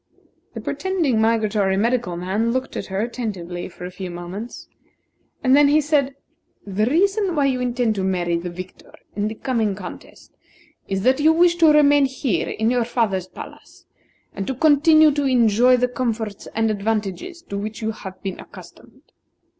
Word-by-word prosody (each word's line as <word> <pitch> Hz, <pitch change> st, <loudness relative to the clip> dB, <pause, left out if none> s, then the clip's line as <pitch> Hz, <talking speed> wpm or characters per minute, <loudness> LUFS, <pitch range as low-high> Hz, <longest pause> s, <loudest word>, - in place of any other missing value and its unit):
The -, -, -5 dB
pretending 335 Hz, -12 st, -1 dB
migratory 215 Hz, -3 st, +1 dB
medical 230 Hz, -4 st, 0 dB
man 200 Hz, +6 st, -1 dB
looked 260 Hz, +1 st, -3 dB
at -, -, -4 dB
her 195 Hz, +1 st, -2 dB
attentively 195 Hz, -8 st, -5 dB
for 180 Hz, -, -10 dB
a 180 Hz, -, -7 dB
few 185 Hz, 0 st, -7 dB
moments, 175 Hz, +7 st, -8 dB, 0.8 s
and 260 Hz, 0 st, +5 dB
then 290 Hz, 0 st, +6 dB
he 295 Hz, +2 st, +4 dB
said: 285 Hz, -2 st, +1 dB, 0.5 s
"The 205 Hz, +2 st, -1 dB
reason 390 Hz, -, +1 dB
why 285 Hz, -2 st, +2 dB
you 260 Hz, -2 st, 0 dB
intend 245 Hz, -2 st, 0 dB
to 195 Hz, -2 st, -3 dB
marry 175 Hz, -2 st, 0 dB
the 170 Hz, +1 st, -3 dB
victor 185 Hz, +1 st, -11 dB, 0.2 s
in 205 Hz, 0 st, -1 dB
the 220 Hz, -, -5 dB
coming 225 Hz, -5 st, -1 dB
contest, 185 Hz, -2 st, -11 dB, 0.5 s
is 195 Hz, 0 st, -2 dB
that 260 Hz, +3 st, +3 dB
you 310 Hz, +2 st, +5 dB
wish 345 Hz, +1 st, +4 dB
to 325 Hz, -2 st, +6 dB
remain 290 Hz, -1 st, +5 dB
here 260 Hz, -, -2 dB
in 220 Hz, +2 st, 0 dB
your 245 Hz, -1 st, +1 dB
father's 215 Hz, -6 st, -1 dB
palace, -, -, -12 dB, 0.5 s
and 195 Hz, -, -5 dB
to 265 Hz, -, -2 dB
continue 310 Hz, +2 st, +5 dB
to 290 Hz, 0 st, -1 dB
enjoy 245 Hz, -1 st, +4 dB
the 250 Hz, 0 st, +1 dB
comforts 230 Hz, -5 st, -4 dB
and 225 Hz, 0 st, +1 dB
advantages 215 Hz, -, -3 dB
to 200 Hz, -, -7 dB
which 215 Hz, +2 st, -6 dB
you 220 Hz, -, 0 dB
have 190 Hz, -3 st, -10 dB
been 195 Hz, -2 st, -5 dB
accustomed." -, -, -14 dB
230 Hz, 170 wpm, -21 LUFS, 195-275 Hz, 0.8 s, then